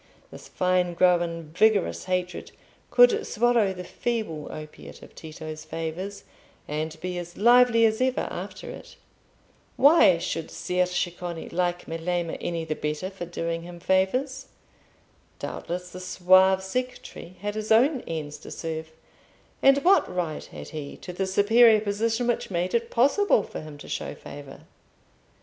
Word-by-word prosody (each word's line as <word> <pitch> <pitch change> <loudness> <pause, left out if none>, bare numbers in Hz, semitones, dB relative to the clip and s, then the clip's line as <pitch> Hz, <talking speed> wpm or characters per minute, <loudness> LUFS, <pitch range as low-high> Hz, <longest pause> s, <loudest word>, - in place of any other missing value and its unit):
This - - -11
fine 180 -1 0
grown 170 -3 +1
vigorous 215 -2 +2
hatred 180 -1 -3 0.4
could 475 -3 +5
swallow 235 -3 +2
the 180 -1 -7
feeble 195 -7 -3
opiate 155 0 -10
of - - -14
Tito's 155 -1 -8
favours, 165 +5 -5 0.4
and 155 +1 -4
be 180 -1 -3
as 175 0 -9
lively 240 +1 +6
as 220 +2 +1
ever 255 0 +1
after - - -7
it. - - -11 0.8
Why 260 - +6
should 165 -1 -4
Ser 180 0 -1
Ceccone 175 -1 -4
like 175 0 -1
Melema 165 +1 -2
any 170 -1 -3
the 155 - -2
better 150 +5 -3
for 185 -3 -7
doing 165 -1 -3
him 175 0 -10
favours? 190 +10 0 0.9
Doubtless 180 +1 -5
the 180 - -8
suave 185 +1 +4
secretary 250 -4 -5
had 205 0 -3
his 215 0 -4
own 255 +4 +4
ends 150 -3 -5
to - - -11
serve; 160 -1 -5 0.7
and 275 +1 +5
what 380 - +4
right 175 -4 -3
had - - -10
he 150 -3 -7
to 180 - -8
the 190 +2 -2
superior 220 +3 +5
position 220 +3 -1
which 240 -1 -1
made 180 0 -2
it 235 0 0
possible 275 - +3
for - - -7
him 155 -1 -10
to - - -12
show - - -4
favour? 140 -1 -11
180 Hz, 145 wpm, -26 LUFS, 165-220 Hz, 0.9 s, lively